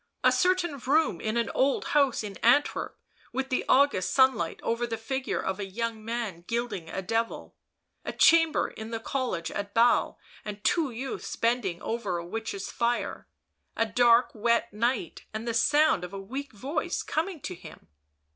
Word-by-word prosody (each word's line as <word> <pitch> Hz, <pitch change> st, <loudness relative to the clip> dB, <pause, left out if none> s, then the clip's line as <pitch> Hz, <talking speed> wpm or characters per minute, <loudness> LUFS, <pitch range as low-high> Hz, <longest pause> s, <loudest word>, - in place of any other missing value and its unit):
a -, -, +6 dB
certain 360 Hz, -5 st, +1 dB
room 275 Hz, -, +1 dB
in 220 Hz, +1 st, -1 dB
an 235 Hz, -1 st, 0 dB
old 270 Hz, +1 st, +1 dB
house 280 Hz, -6 st, +3 dB
in 200 Hz, -2 st, -6 dB
Antwerp 270 Hz, +5 st, +2 dB, 0.3 s
with 265 Hz, +2 st, -3 dB
the 255 Hz, -, 0 dB
August 265 Hz, -9 st, +4 dB
sunlight 260 Hz, -1 st, +3 dB
over 235 Hz, +1 st, -1 dB
the 225 Hz, -1 st, -3 dB
figure 265 Hz, +4 st, -2 dB
of 190 Hz, +1 st, -3 dB
a 200 Hz, -, -2 dB
young 225 Hz, +2 st, -3 dB
man 225 Hz, -7 st, -4 dB
gilding 230 Hz, -8 st, -3 dB
a 190 Hz, -, -4 dB
devil... 225 Hz, +4 st, -2 dB, 0.5 s
a -, -, -3 dB
chamber 325 Hz, -1 st, +4 dB
in 220 Hz, 0 st, -8 dB
the 225 Hz, -1 st, -3 dB
college 230 Hz, -8 st, -2 dB
at 205 Hz, 0 st, -5 dB
Basle 235 Hz, +1 st, +3 dB, 0.3 s
and 210 Hz, -1 st, -7 dB
two 325 Hz, +3 st, +2 dB
youths 250 Hz, +2 st, -5 dB
bending 230 Hz, -7 st, 0 dB
over 215 Hz, -6 st, -2 dB
a 170 Hz, -, -5 dB
witch's 200 Hz, 0 st, -5 dB
fire... 240 Hz, 0 st, -1 dB, 0.5 s
a 225 Hz, -, +3 dB
dark 235 Hz, +2 st, +4 dB
wet 235 Hz, 0 st, +1 dB
night, 230 Hz, -4 st, -1 dB
and 220 Hz, +2 st, -4 dB
the 230 Hz, -, 0 dB
sound 290 Hz, -, +3 dB
of 180 Hz, +2 st, -7 dB
a 195 Hz, -, -5 dB
weak 260 Hz, +8 st, -6 dB
voice 265 Hz, +9 st, -3 dB
coming 330 Hz, +2 st, -2 dB
to 185 Hz, -, -5 dB
him 170 Hz, -3 st, -13 dB
235 Hz, 170 wpm, -28 LUFS, 210-265 Hz, 0.5 s, a